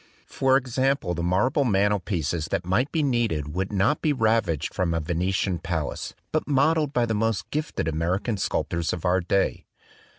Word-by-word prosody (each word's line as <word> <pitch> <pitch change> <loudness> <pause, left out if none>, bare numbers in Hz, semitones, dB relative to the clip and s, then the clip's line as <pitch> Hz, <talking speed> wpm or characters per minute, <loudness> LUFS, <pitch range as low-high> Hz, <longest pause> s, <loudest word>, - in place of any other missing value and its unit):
For 135 0 +2
example 130 -6 0
the 85 - -3
marble 95 - +2
mantelpieces 95 - 0
that 95 -1 -2
might 115 +10 +1
be 160 -2 +1
needed 115 - 0
would 95 +3 -2
not 105 +9 +1
be 150 - +2
ravished 110 - +1
from 85 -3 0
a - - +1
Venetian 90 +3 -1
palace, 80 -4 -3 0.2
but 155 - -1
modelled 150 +1 +2
by 120 -3 +2
the 115 - -1
most 115 -1 0
gifted 150 - -2
American 90 +8 -1
sculptors 85 -3 -1
of 90 0 -5
our 90 +1 +3
day. 95 +3 0
100 Hz, 165 wpm, -25 LUFS, 85-130 Hz, 0.2 s, our